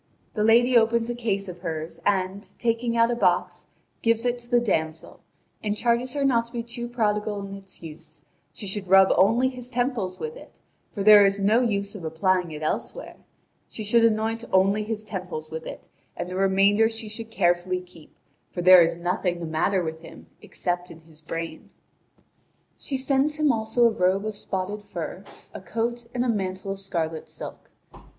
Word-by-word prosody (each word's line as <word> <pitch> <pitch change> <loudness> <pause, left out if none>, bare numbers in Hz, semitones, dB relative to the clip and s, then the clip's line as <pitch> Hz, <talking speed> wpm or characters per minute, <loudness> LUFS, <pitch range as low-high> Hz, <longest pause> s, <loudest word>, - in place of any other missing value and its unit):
The 210 - 0
lady 240 +3 +5
opens 230 0 +3
a - - -2
case 205 -5 -2
of 180 -1 -8
hers, 165 -1 -5
and, 190 +1 -1
taking 235 0 0
out 230 +1 +4
a - - 0
box, 235 - 0 0.3
gives 230 0 +1
it 245 0 0
to 240 0 -17
the 245 -1 +4
damsel, 160 -8 -2 0.4
and 210 0 -1
charges 240 +2 +1
her 280 -1 +1
not 235 -4 +3
to 235 - -16
be 235 -1 -4
too 240 +1 -6
prodigal 210 -3 -1
in 195 - -8
its 195 -3 -12
use: 160 -1 -12 0.3
she 210 - -8
should 195 0 -4
rub 190 +1 +6
only 230 +7 +4
his 250 -1 -6
temples 245 -7 -1
with 465 0 -5
it, - - -14 0.3
for 200 - -4
there 210 0 +9
is 195 0 +3
no 210 +4 +3
use 200 -4 -1
of 200 -5 -9
applying 180 +3 0
it 155 -1 -7
elsewhere; - - -4 0.5
she 220 - -6
should 230 +2 +3
anoint 225 +1 +1
only 195 +3 +3
his 215 0 -4
temples 180 -6 -6
with 160 0 -6
it, - - -9 0.3
and - - -3
the 180 - -6
remainder 195 +3 +3
she 225 -1 -6
should 225 +1 -6
carefully 180 -2 +1
keep, 180 -3 -16 0.4
for 175 - -5
there 185 0 +9
is 165 0 +2
nothing 175 0 -1
the 170 - -5
matter 170 +4 0
with 160 -1 -4
him - - -13 0.2
except 175 0 -3
in 165 0 -12
his 160 -1 -17
brain. 165 0 -6 1.1
She 270 - -4
sends 275 +3 +1
him 305 -2 +3
also 225 +1 +1
a 230 - +5
robe 190 +1 +1
of 215 -1 -3
spotted 200 +1 -3
fur, 185 -2 -6 0.3
a - - -8
coat, 230 +4 -3
and 245 0 -1
a - - 0
mantle 195 -3 -2
of 195 - -5
scarlet 165 -5 -3
silk. - - -8
205 Hz, 190 wpm, -25 LUFS, 180-230 Hz, 1.1 s, there